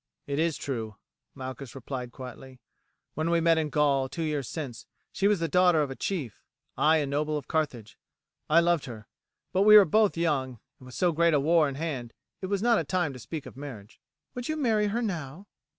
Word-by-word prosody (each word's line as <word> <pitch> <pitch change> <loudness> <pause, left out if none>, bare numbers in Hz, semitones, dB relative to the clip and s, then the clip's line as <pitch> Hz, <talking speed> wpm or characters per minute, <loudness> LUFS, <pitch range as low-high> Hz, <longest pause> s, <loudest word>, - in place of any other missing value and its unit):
"It 140 +1 -2
is 165 -1 +1
true," 115 -6 -4 0.4
Malchus 130 0 -7
replied 125 -1 -6
quietly. 130 0 -10 0.5
"When 155 +2 -1
we 170 0 +3
met 165 -1 +3
in 155 -1 -1
Gaul, 140 -3 +2
two 165 - -4
years 150 -6 -2
since, 135 -8 -6 0.2
she 195 - +1
was 205 -3 +2
the 165 - 0
daughter 180 -3 +4
of 140 - -4
a - - -5
chief, 145 - -4 0.3
I 155 +1 +4
a 150 - 0
noble 150 +2 -1
of 145 - -7
Carthage. 130 -9 -3 0.5
I 165 +2 +6
loved 170 -3 +1
her; 110 -4 -9 0.5
but 185 - +2
we 210 +1 +9
were 205 - +8
both 210 +2 +2
young, 135 -7 -1 0.2
and 130 - -14
with 125 - -11
so 180 -1 +2
great 170 0 +3
a - - +4
war 155 +1 +3
in 135 - -6
hand 135 -6 -4 0.3
it 190 - -3
was 200 +1 -1
not 235 -2 +4
a - - -1
time 170 -2 -1
to 125 - -10
speak 150 +5 -6
of - - -11
marriage." 125 -7 -10 0.3
"Would 245 +2 -5
you 310 - -1
marry 220 -7 +2
her 230 +4 -1
now?" 170 -3 -5
155 Hz, 215 wpm, -28 LUFS, 135-175 Hz, 0.5 s, we